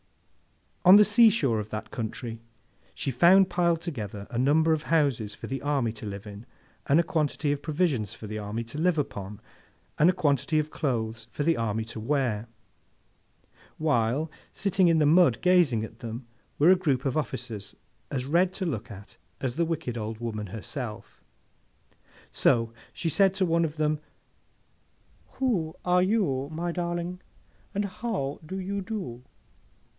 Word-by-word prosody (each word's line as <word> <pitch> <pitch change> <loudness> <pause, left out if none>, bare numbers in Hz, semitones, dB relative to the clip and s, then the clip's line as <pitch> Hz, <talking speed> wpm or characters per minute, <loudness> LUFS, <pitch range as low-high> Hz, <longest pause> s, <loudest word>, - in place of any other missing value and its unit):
On 185 +2 +9
the 210 0 +8
sea 225 +2 +6
shore 135 - +1
of 105 0 -5
that 105 0 -6
country, 115 0 -5 0.5
she 135 - -2
found 180 +8 +5
piled 170 -2 +2
together, 105 - -5
a 120 - -2
number 155 +5 +4
of 155 - 0
houses 140 -11 +1
for - - -8
the 135 0 -4
army 140 -5 0
to 110 -1 -8
live 100 0 -6
in, 105 +3 -10 0.4
and 145 +4 +5
a - - +4
quantity 150 -2 0
of 145 0 -2
provisions 145 - 0
for - - -10
the 110 +1 -5
army 105 +3 -4
to 115 +6 -7
live 175 0 +2
upon, 105 -8 -4 0.6
and 160 - +6
a - - +3
quantity 155 -2 +1
of 155 0 0
clothes 115 -5 -2
for 145 - -3
the 165 +2 +3
army 110 -1 -1
to 115 0 -7
wear: 120 -3 -1 1.3
while, 145 0 +1 0.2
sitting 190 -2 +2
in 165 -1 +4
the 155 - +4
mud 170 +4 +5
gazing 175 -12 +4
at 110 0 -14
them, 115 +2 -6 0.3
were 160 +5 +6
a - - +7
group 145 -8 0
of 135 - 0
officers 120 -8 -4 0.3
as 130 -2 -2
red 175 +6 +3
to 190 - -3
look 125 - -3
at 100 -1 -12 0.2
as 130 -3 -2
the 170 - +2
wicked 155 -8 -3
old 110 +1 -4
woman 110 -2 -4
herself. 110 +2 -7 1.1
So, 115 -1 +2 0.2
she 170 - -4
said 195 +4 +3
to 190 -1 +2
one 170 -1 +2
of 155 0 -5
them, 155 0 +1 1.3
'Who 195 -12 -1
are 180 0 +4
you, 180 -10 +1
my 170 +2 -2
darling, 175 +1 -3 0.5
and 205 +1 0
how 190 -8 -3
do 185 +5 -6
you 200 +2 -3
do? 185 - -5
145 Hz, 165 wpm, -27 LUFS, 115-175 Hz, 1.3 s, On